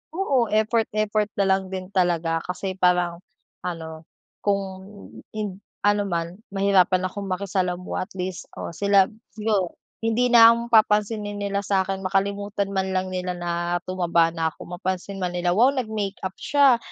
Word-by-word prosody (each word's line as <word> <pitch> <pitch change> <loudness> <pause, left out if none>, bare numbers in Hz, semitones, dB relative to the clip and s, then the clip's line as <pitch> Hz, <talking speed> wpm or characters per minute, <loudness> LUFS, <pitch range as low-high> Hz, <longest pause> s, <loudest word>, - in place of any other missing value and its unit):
Oo 275 -11 +2
effort, 220 +1 +2
effort 215 0 +1
nalang 190 -1 +2
din 185 0 -6
talaga 170 -3 +1
kasi 185 +1 -4
parang 180 -1 +2 0.4
ano, 160 -2 -6 0.3
kung 200 -1 +1 0.7
ind 205 -3 -4 0.2
ano 205 0 +3
man 170 -1 -2 0.2
mahirapan 190 -2 +3
akong 200 +2 -6
makisalamuha 185 -1 -2
at - - -46
least 185 -1 -4
o - - -5
sila 200 0 +4 0.3
siguro 210 -5 0 0.3
hindi 225 +2 +2
na 230 -1 +9
ako 235 0 -4
papansinin 210 -1 +2
nila 200 0 -1
sa'kin 195 -1 0
makalimutan 200 +1 -1
man 190 0 0
lang 185 0 0
nila 180 0 -3
na 175 0 -1
tumaba 170 -2 +2
na 165 -1 -1
ako 175 0 -9
mapansin 185 +1 -3
man 180 -1 -1
nila, 175 0 +1
"Wow 255 +5 +5
nag-makeup 210 -6 -3
siya, 280 -4 +4
195 Hz, 145 wpm, -24 LUFS, 180-210 Hz, 0.7 s, na